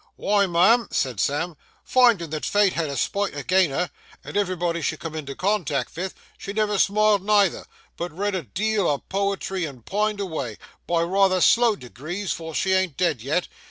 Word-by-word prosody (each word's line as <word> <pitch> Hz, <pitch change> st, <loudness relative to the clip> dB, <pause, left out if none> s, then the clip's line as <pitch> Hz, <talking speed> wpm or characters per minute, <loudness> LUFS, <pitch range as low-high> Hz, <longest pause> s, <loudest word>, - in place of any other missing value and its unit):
'Why, 200 Hz, -1 st, +2 dB
ma'am,' 195 Hz, +7 st, +4 dB
said 125 Hz, -6 st, -1 dB
Sam, 160 Hz, -, -1 dB, 0.3 s
'finding 235 Hz, -, +3 dB
that 155 Hz, -1 st, -4 dB
Fate 205 Hz, -2 st, +3 dB
had 165 Hz, -3 st, -1 dB
a 140 Hz, -, -4 dB
spite 200 Hz, -5 st, -1 dB
agin 180 Hz, +5 st, +2 dB
her, 155 Hz, +6 st, -2 dB, 0.3 s
and -, -, -9 dB
everybody 180 Hz, -4 st, 0 dB
she -, -, -1 dB
come 165 Hz, -2 st, -7 dB
into 140 Hz, -3 st, -6 dB
contact 180 Hz, -8 st, -1 dB
vith, 185 Hz, +3 st, -4 dB, 0.2 s
she 200 Hz, -, -6 dB
never 210 Hz, -1 st, 0 dB
smiled 210 Hz, 0 st, +3 dB
neither, 205 Hz, -2 st, +2 dB, 0.3 s
but 175 Hz, +1 st, -4 dB
read 200 Hz, +5 st, -2 dB
a 185 Hz, -, -1 dB
deal 205 Hz, -, -1 dB
o' 145 Hz, -, +2 dB
poetry 195 Hz, +1 st, -2 dB
and 130 Hz, -7 st, -10 dB
pined 210 Hz, +1 st, -1 dB
avay,—by 165 Hz, -, -4 dB
rayther 190 Hz, +1 st, +3 dB
slow 230 Hz, +4 st, +4 dB
degrees, 170 Hz, +7 st, -6 dB
for 160 Hz, -1 st, -5 dB
she 190 Hz, 0 st, +1 dB
ain't 190 Hz, -5 st, +1 dB
dead 170 Hz, -9 st, +1 dB
yet. 155 Hz, +8 st, -1 dB
185 Hz, 175 wpm, -24 LUFS, 160-205 Hz, 0.3 s, ma'am